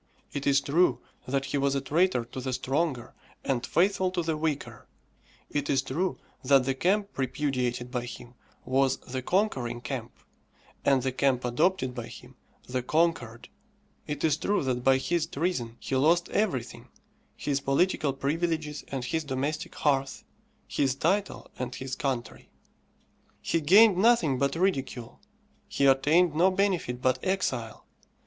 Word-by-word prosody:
It 140 - -3
is 140 0 +4
true 140 -4 +2 0.3
that 135 +1 -1
he 140 +1 -1
was 140 0 +1
a - - +2
traitor 155 -3 +1
to 125 +2 -7
the 130 0 -3
stronger, 135 0 -1 0.3
and 130 -3 0
faithful 190 +6 +2
to 180 -1 -2
the 160 -1 -1
weaker; 145 -7 -3 0.6
it 145 -1 -2
is 135 -1 +2
true 165 +8 -2 0.3
that 135 0 +5
the 135 - +1
camp 200 +8 0
repudiated 125 -2 -1
by 125 -2 -2
him 120 0 -10 0.3
was 135 +1 +2
the 130 +1 -5
conquering 130 - 0
camp, 120 -2 -5 0.7
and 135 -3 +3
the 130 - 0
camp 130 -1 +1
adopted 130 +1 +1
by - - -6
him, - - -13 0.3
the 125 0 -2
conquered; 130 -5 0 0.6
it 150 - -4
is 155 -2 +3
true 200 +3 0
that 125 -2 -1
by 135 0 +5
his 165 +5 -1
treason 135 -8 -2
he 135 - -3
lost 165 +6 +3
everything 130 - -2 0.5
his 140 -1 -2
political 140 +2 +1
privileges 150 +2 -2
and 135 -3 -4
his 160 +5 -1
domestic 145 +2 -3
hearth, 135 -2 0 0.4
his 135 -2 0
title 190 +8 -1
and 125 -1 -4
his 130 0 -5
country. 130 -4 -4 0.9
He 165 - -1
gained 195 +6 +6
nothing 185 - +3
but 140 +2 +1
ridicule, 135 -10 -2 0.5
he 140 - 0
attained 150 +6 +4
no 175 +5 +4
benefit 185 -10 -1
but 130 0 +2
exile. 130 -12 -2
140 Hz, 150 wpm, -28 LUFS, 130-165 Hz, 0.9 s, gained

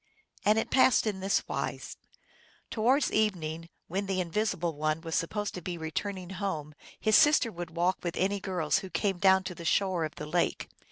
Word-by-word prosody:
And 210 +1 +4
it 225 - -1
passed 260 -3 +5
in 205 -3 -1
this 195 +1 0
wise. - - -4 0.8
Towards 250 +6 +2
evening, 165 -6 -1 0.2
when 195 +3 -2
the 190 -1 -1
Invisible 175 -1 -1
One 155 +1 -1
was 165 -1 -6
supposed 205 +6 -1
to 180 - -6
be 175 +1 -4
returning 180 +3 -4
home, 160 -6 -4 0.3
his 215 -1 +3
sister 295 -6 +5
would 175 -2 -7
walk 180 +2 +1
with 175 0 -4
any 200 +2 +1
girls 175 -7 0
who 190 - -8
came 195 -1 -1
down 190 0 +5
to 185 - -5
the 170 - -10
shore 185 0 +1
of 155 - -4
the - - -6
lake. 170 +3 -1
185 Hz, 185 wpm, -29 LUFS, 165-205 Hz, 0.8 s, passed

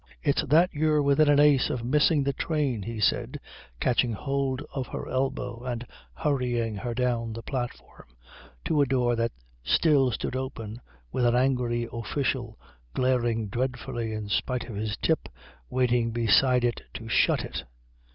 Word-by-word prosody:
"It's 140 -2 +2
that 160 +5 +4
you're 150 0 +2
within 140 +2 +4
an 145 -1 +5
ace 145 -3 +5
of 120 -2 -3
missing 150 +3 +3
the 140 0 0
train," 140 -6 -1
he 115 +2 -5
said, 105 - +1 0.4
catching 120 -1 +2
hold 135 +3 -2
of 130 -3 -3
her - - -6
elbow 125 -2 -2
and 125 -1 -4 0.3
hurrying 120 - 0
her 120 +3 -4
down 120 -2 0
the 115 +1 -7
platform 125 -3 -6 0.6
to 150 -2 +2
a 140 - +3
door 125 -2 +2
that 115 0 0 0.3
still 140 - +4
stood 120 - -3
open, 120 -4 -5 0.3
with 125 - 0
an 120 0 +3
angry 125 -2 +1
official, 120 0 -2 0.4
glaring 120 -4 +1
dreadfully 120 0 -3
in 110 -1 -4
spite 125 +4 -1
of 115 - -7
his 105 +1 -3
tip, - - 0 0.4
waiting 125 -2 +2
beside 120 +2 +3
it 120 -1 0
to 115 - -7
shut 115 - +2
it. - - -5
125 Hz, 155 wpm, -27 LUFS, 115-135 Hz, 0.6 s, an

